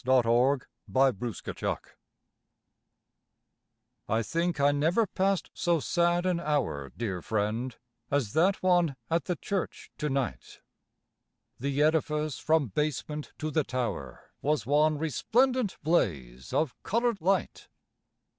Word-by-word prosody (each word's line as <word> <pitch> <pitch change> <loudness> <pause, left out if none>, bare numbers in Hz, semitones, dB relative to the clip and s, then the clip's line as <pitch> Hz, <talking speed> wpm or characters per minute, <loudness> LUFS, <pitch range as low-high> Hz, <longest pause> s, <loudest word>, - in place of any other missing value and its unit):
NOTHING 130 +1 +4 0.3
BUT 135 -2 +3 0.2
STONES - - -3 2.3
I 110 +2 +2
think 170 +5 -1
I 140 +1 +5
never 165 +10 +2
passed 195 -1 0
so 170 -2 +1
sad 175 +3 +1
an 180 -2 +1
hour, 130 - -1
Dear 100 -6 -3
friend, 110 +6 -1 0.3
as 135 -8 0
that 185 +5 +2
one 175 -6 +3 0.2
at 165 +1 +1
the 180 - -1
church 195 +3 -4
to 150 - -1
night. 135 - -3 1.0
The 140 +2 +1
edifice 155 -1 +1
from 155 -5 +2
basement 150 +4 -2
to 155 0 -3
the 155 0 +2
tower 120 - -4
Was 150 -6 0
one 150 +3 +3
resplendent 235 - +1
blaze 65 - 0
of 155 -5 +1
coloured 235 -1 0
light. 190 +3 0
150 Hz, 115 wpm, -29 LUFS, 125-170 Hz, 2.3 s, I